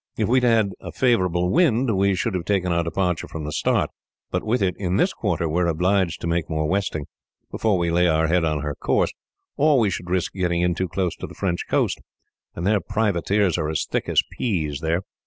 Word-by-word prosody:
If -, -, +1 dB
we 130 Hz, +2 st, +4 dB
had 125 Hz, -, +3 dB
had 110 Hz, -4 st, +3 dB
a -, -, -8 dB
favourable 90 Hz, -8 st, +1 dB
wind, 125 Hz, -, +3 dB
we 100 Hz, 0 st, +2 dB
should 115 Hz, +3 st, -1 dB
have 90 Hz, -2 st, -2 dB
taken 95 Hz, -3 st, 0 dB
our 85 Hz, 0 st, +1 dB
departure 90 Hz, +1 st, -1 dB
from 80 Hz, -, -6 dB
the 75 Hz, -, -4 dB
Start, -, -, +1 dB, 0.4 s
but -, -, -1 dB
with 120 Hz, +3 st, +1 dB
it 90 Hz, -1 st, +1 dB
in 95 Hz, -1 st, 0 dB
this -, -, +2 dB
quarter 85 Hz, -, -1 dB
we 85 Hz, +3 st, 0 dB
are 85 Hz, -, +2 dB
obliged 90 Hz, +2 st, +1 dB
to -, -, -3 dB
make 85 Hz, 0 st, -1 dB
more 80 Hz, -1 st, -1 dB
westing, 95 Hz, -5 st, -1 dB, 0.5 s
before 110 Hz, -4 st, +1 dB
we 85 Hz, -1 st, 0 dB
lay 90 Hz, +1 st, +3 dB
her 80 Hz, -1 st, +2 dB
head 85 Hz, +2 st, +2 dB
on 75 Hz, -2 st, 0 dB
her 75 Hz, -1 st, -2 dB
course, 75 Hz, -, 0 dB, 0.4 s
or 150 Hz, 0 st, +4 dB
we 110 Hz, -5 st, +2 dB
should 90 Hz, -1 st, -5 dB
risk 90 Hz, -1 st, 0 dB
getting 90 Hz, -2 st, 0 dB
in 90 Hz, 0 st, +2 dB
too 95 Hz, +2 st, -2 dB
close 90 Hz, 0 st, -2 dB
to -, -, -6 dB
the -, -, -12 dB
French 90 Hz, -3 st, -2 dB
coast; -, -, +1 dB, 0.5 s
and 85 Hz, -, -4 dB
their 105 Hz, +1 st, +3 dB
privateers 100 Hz, -3 st, +1 dB
are 75 Hz, -1 st, -1 dB
as 80 Hz, 0 st, -1 dB
thick -, -, -2 dB
as -, -, +3 dB
peas, 80 Hz, -, -1 dB
there." 85 Hz, +3 st, -1 dB
90 Hz, 230 wpm, -23 LUFS, 85-100 Hz, 0.5 s, we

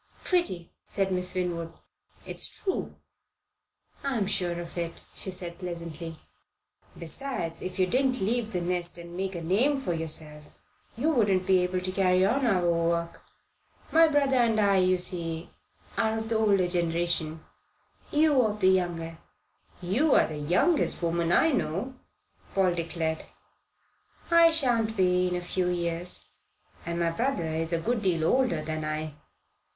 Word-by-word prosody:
"Pretty,"' 190 Hz, -, 0 dB, 0.2 s
said 195 Hz, -1 st, -1 dB
Miss 180 Hz, 0 st, 0 dB
Winwood. 170 Hz, -2 st, -2 dB, 0.5 s
"It's -, -, -1 dB
true." 380 Hz, -, -3 dB, 1.1 s
"I'm 260 Hz, -7 st, 0 dB
sure 175 Hz, -3 st, -1 dB
of 170 Hz, -1 st, -8 dB
it," 170 Hz, -1 st, -4 dB
she -, -, -5 dB
said 180 Hz, -2 st, -5 dB
pleasantly. 170 Hz, -2 st, -6 dB, 0.8 s
"Besides, 170 Hz, -, -4 dB
if 185 Hz, -, -5 dB
you 185 Hz, -, +4 dB
didn't 255 Hz, +5 st, +1 dB
leave 225 Hz, +2 st, 0 dB
the 180 Hz, -4 st, -1 dB
nest 175 Hz, 0 st, -2 dB
and 170 Hz, 0 st, -10 dB
make 190 Hz, 0 st, -3 dB
a 170 Hz, -, -5 dB
name 245 Hz, -, +2 dB
for 260 Hz, -10 st, -2 dB
yourself, 155 Hz, -2 st, -6 dB, 0.4 s
you 295 Hz, +7 st, +2 dB
wouldn't 200 Hz, -9 st, +2 dB
be 190 Hz, -1 st, +4 dB
able 180 Hz, 0 st, 0 dB
to 185 Hz, 0 st, -2 dB
carry 185 Hz, -1 st, +3 dB
on 265 Hz, +5 st, +2 dB
our 180 Hz, -5 st, +2 dB
work. 170 Hz, 0 st, 0 dB, 0.7 s
My 325 Hz, 0 st, +7 dB
brother 280 Hz, -3 st, +2 dB
and 230 Hz, -3 st, +3 dB
I, 200 Hz, -2 st, +4 dB
you 185 Hz, 0 st, +3 dB
see, 170 Hz, -2 st, -4 dB, 0.5 s
are 220 Hz, -1 st, +1 dB
of 220 Hz, 0 st, -4 dB
the 225 Hz, -, +2 dB
older 200 Hz, -4 st, +3 dB
generation 170 Hz, -2 st, -1 dB, 0.7 s
you 300 Hz, -3 st, +4 dB
of 215 Hz, -2 st, 0 dB
the 185 Hz, -2 st, +5 dB
younger." 170 Hz, -3 st, 0 dB, 0.6 s
"You're 245 Hz, -, +4 dB
the 155 Hz, -, -6 dB
youngest 180 Hz, -, +1 dB
woman 170 Hz, 0 st, +1 dB
I 320 Hz, -, +4 dB
know," 245 Hz, -, -1 dB, 0.6 s
Paul 190 Hz, -2 st, +3 dB
declared. 165 Hz, -1 st, -2 dB, 1.1 s
"I 335 Hz, 0 st, +7 dB
shan't 240 Hz, -8 st, +1 dB
be 180 Hz, -1 st, +3 dB
in 180 Hz, -, -1 dB
a 180 Hz, -, -2 dB
few 180 Hz, +1 st, -1 dB
years, 175 Hz, 0 st, -1 dB, 0.6 s
and 170 Hz, 0 st, -2 dB
my 170 Hz, -1 st, +1 dB
brother 230 Hz, -1 st, -1 dB
is 160 Hz, +1 st, -2 dB
a 170 Hz, -, +2 dB
good 230 Hz, +6 st, -1 dB
deal 175 Hz, -5 st, +1 dB
older 245 Hz, -7 st, +2 dB
than 155 Hz, 0 st, -3 dB
I." 155 Hz, 0 st, -3 dB
180 Hz, 150 wpm, -28 LUFS, 170-220 Hz, 1.1 s, My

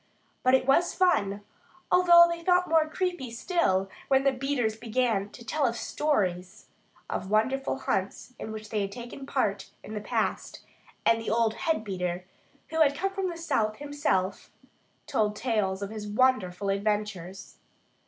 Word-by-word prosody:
But 255 Hz, +1 st, +5 dB
it 260 Hz, -, +1 dB
was 275 Hz, +6 st, +3 dB
fun, 205 Hz, -, +2 dB, 0.5 s
although 345 Hz, -1 st, +8 dB
they 340 Hz, 0 st, -4 dB
felt 360 Hz, +1 st, +3 dB
more 320 Hz, -2 st, +3 dB
creepy 355 Hz, -6 st, -2 dB
still 230 Hz, -, 0 dB, 0.2 s
when 270 Hz, 0 st, +3 dB
the 275 Hz, -, +4 dB
beaters 255 Hz, -4 st, -1 dB
began 225 Hz, -3 st, 0 dB
to 235 Hz, +2 st, -13 dB
tell 275 Hz, 0 st, +1 dB
stories 195 Hz, -7 st, -1 dB, 0.4 s
of 190 Hz, -, -4 dB
wonderful 265 Hz, +7 st, +1 dB
hunts 200 Hz, 0 st, -3 dB
in 220 Hz, -, -6 dB
which 215 Hz, -1 st, -7 dB
they 215 Hz, -2 st, 0 dB
had 200 Hz, 0 st, -3 dB
taken 245 Hz, +4 st, -8 dB
part 215 Hz, -9 st, -1 dB
in 215 Hz, -, -8 dB
the 210 Hz, -, -4 dB
past; -, -, -2 dB, 0.4 s
and 230 Hz, 0 st, +4 dB
the 225 Hz, -, -4 dB
old 225 Hz, 0 st, +2 dB
head 315 Hz, -1 st, -1 dB
beater, 180 Hz, -3 st, -3 dB, 0.4 s
who 320 Hz, 0 st, 0 dB
had 285 Hz, -2 st, +4 dB
come 390 Hz, +2 st, -1 dB
from 385 Hz, -1 st, -2 dB
the 340 Hz, -, -6 dB
south, 220 Hz, -10 st, 0 dB
himself, 285 Hz, -10 st, -1 dB, 0.6 s
told 215 Hz, -6 st, 0 dB
tales 210 Hz, -4 st, -1 dB
of 200 Hz, -, -5 dB
his 215 Hz, -1 st, -6 dB
wonderful 205 Hz, -5 st, +1 dB
adventures. 200 Hz, -2 st, -3 dB
230 Hz, 155 wpm, -28 LUFS, 205-285 Hz, 0.6 s, although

